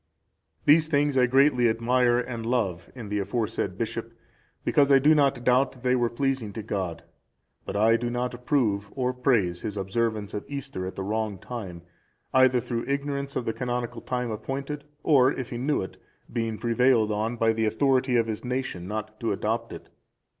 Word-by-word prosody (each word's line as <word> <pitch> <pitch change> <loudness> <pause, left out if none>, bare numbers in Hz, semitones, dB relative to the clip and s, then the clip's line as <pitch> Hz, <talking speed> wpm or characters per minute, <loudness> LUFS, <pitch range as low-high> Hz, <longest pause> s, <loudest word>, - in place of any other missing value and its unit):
These 155 +2 +6
things 145 -2 +1
I 125 -1 +4
greatly 130 -2 +4
admire 120 +2 +2
and 120 -2 -3
love 100 -8 -1
in 115 -5 -8
the 105 0 -1
aforesaid 105 +3 -2
bishop, - - -4 0.5
because 140 -1 +3
I 135 - +8
do 145 +4 +5
not 140 -5 +2
doubt 125 +2 +3
that 125 -2 -17
they 125 0 +3
were 120 -2 +1
pleasing 130 -4 -1
to 110 - -5
God; 95 -5 -3 0.6
but - - -4
I 110 +3 +4
do 120 0 -2
not 125 +1 -2
approve 120 -5 0
or 125 -1 0
praise 115 -9 +1
his 105 -1 -4
observance 105 +2 -1
of 105 - -3
Easter 135 -10 -5
at 95 - -7
the 95 - -4
wrong 105 0 -2
time, 95 -7 -7 0.5
either 130 -1 +5
through 120 0 -3
ignorance 140 0 -2
of 125 - -2
the 115 - -1
canonical 120 -1 -3
time 125 -2 -2
appointed, 140 +6 -5 0.2
or, 135 -4 +5
if 130 -4 -5
he 120 - -4
knew 140 -3 0
it, 95 - -9 0.4
being 115 -2 -1
prevailed 120 -1 +3
on 110 +3 -1
by 115 -1 +2
the 110 0 0
authority 130 +2 +2
of 115 -1 +3
his 110 -2 -4
nation 125 -8 -3
not 110 +1 -5
to 115 - -1
adopt 115 +3 -2
it. - - -10
120 Hz, 185 wpm, -26 LUFS, 110-130 Hz, 0.6 s, I